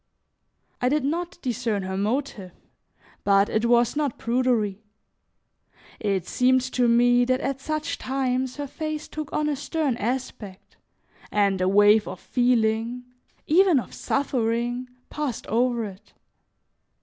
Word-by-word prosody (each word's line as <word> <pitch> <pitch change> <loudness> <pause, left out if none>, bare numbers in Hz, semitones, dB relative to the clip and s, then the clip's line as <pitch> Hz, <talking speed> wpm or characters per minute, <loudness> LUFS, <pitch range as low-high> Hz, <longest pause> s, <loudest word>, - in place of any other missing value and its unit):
I 250 - +2
did 295 +1 +1
not 345 +5 -2
discern 230 -5 -1
her 190 0 -4
motive, 205 -3 -2 0.7
but 200 0 +4
it 220 +1 0
was 240 +1 +3
not 290 -4 -1
prudery; 230 -5 0 1.2
it 195 -4 -1
seemed 255 +1 +3
to 245 -1 +2
me 245 +1 +4
that 255 +1 +1
at 270 -1 -3
such 310 +1 -3
times 260 -1 -1
her 290 - -4
face 310 +2 -5
took 305 -1 -6
on 300 -2 0
a 295 - 0
stern 290 -2 -1
aspect 220 -4 -5 0.5
and 200 -2 +1
a 185 - +2
wave 205 +2 +5
of - - -6
feeling, 240 -1 +1 0.4
even 350 -2 +4
of - - -8
suffering, 245 -2 -1 0.2
passed 295 -6 -3
over 235 0 +1
it. 195 -1 -12
245 Hz, 130 wpm, -25 LUFS, 220-275 Hz, 1.2 s, wave